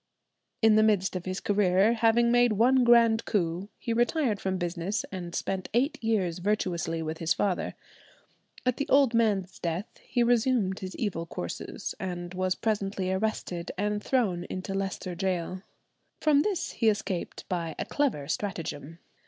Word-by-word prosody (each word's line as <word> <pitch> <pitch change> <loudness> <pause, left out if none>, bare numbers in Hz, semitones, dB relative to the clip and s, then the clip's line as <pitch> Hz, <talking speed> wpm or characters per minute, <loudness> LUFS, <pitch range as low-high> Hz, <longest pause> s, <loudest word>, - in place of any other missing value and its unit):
In 220 -1 +6
the - - +6
midst 205 -4 +2
of 180 - -4
his 185 0 -3
career, 200 +1 +3
having 235 +1 +3
made 245 -1 +4
one 250 +5 +4
grand 230 -2 +5
coup, 180 -1 -1
he 230 - -2
retired 240 -2 +1
from 190 -1 -1
business 175 +3 -2
and 175 -3 -6
spent 190 -1 -2
eight 260 +1 +1
years 190 -7 0
virtuously 175 -4 -1
with 160 0 -4
his 165 0 +1
father. 195 -3 -1 0.9
At 250 -1 +1
the 285 - -2
old 275 -3 +5
man's 205 -5 +1
death 170 +3 -2 0.2
he 240 - 0
resumed 235 -5 +2
his 185 -1 -6
evil 170 -7 -2
courses, 85 - -5
and 175 -1 -5
was 185 0 0
presently 195 -4 -1
arrested 190 -3 -2
and 210 +1 -1
thrown 195 -10 +1
into 185 +1 -5
Leicester 195 -2 -3
Gaol. 185 0 -2 0.6
From 300 -2 +4
this 360 -2 -1
he 225 - +2
escaped 195 -4 -3
by 170 -3 -3
a - - -3
clever 235 - -1
stratagem. 165 -5 -4
195 Hz, 155 wpm, -28 LUFS, 180-230 Hz, 0.9 s, In